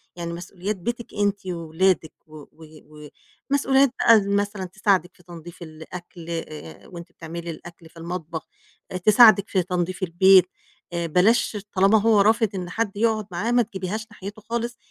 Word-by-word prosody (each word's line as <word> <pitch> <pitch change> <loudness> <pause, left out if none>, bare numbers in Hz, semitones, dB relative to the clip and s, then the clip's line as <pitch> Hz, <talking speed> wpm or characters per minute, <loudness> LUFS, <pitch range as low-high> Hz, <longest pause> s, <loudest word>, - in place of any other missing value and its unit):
يعني 170 -1 -5
مسؤوليات 180 +4 -5
بيتِك 235 +5 -6
أنتِ 205 -1 -1
وولادِك، 170 -1 0
و 155 0 -13
و 155 -1 -15 0.4
ومسؤوليات 275 -1 +3
بقى 225 -2 +6
مثلًا 200 -1 -1
تساعدِك 190 -1 0
في 180 - -22
تنضيف 170 0 -12
الأكل، 170 +2 -10
آآ، 155 - -7
وأنتِ 170 -1 -11
بتعملي 170 0 -8
الأكل 165 0 -11
في 165 - -20
المطبخ، 165 -1 -6 0.4
آآ، 185 - -3
تساعدِك 215 +1 +6
في 185 -2 +1
تنظيف 180 +1 -3
البيت. 185 +1 +5 0.5
آآ، 170 0 -2
بلاش، 205 +7 +2 0.2
طالما 195 +3 +4
هو 220 -1 +4
رافض، 220 +1 +3
إن 180 -2 -5
حد 205 0 -3
يقعد 220 -2 0
معاه 180 +7 -2
ما 245 0 +4
تجبيهاش 210 0 -4
ناحيته 210 +1 -9
خالص، 235 +2 -4
185 Hz, 155 wpm, -23 LUFS, 170-210 Hz, 0.5 s, بقى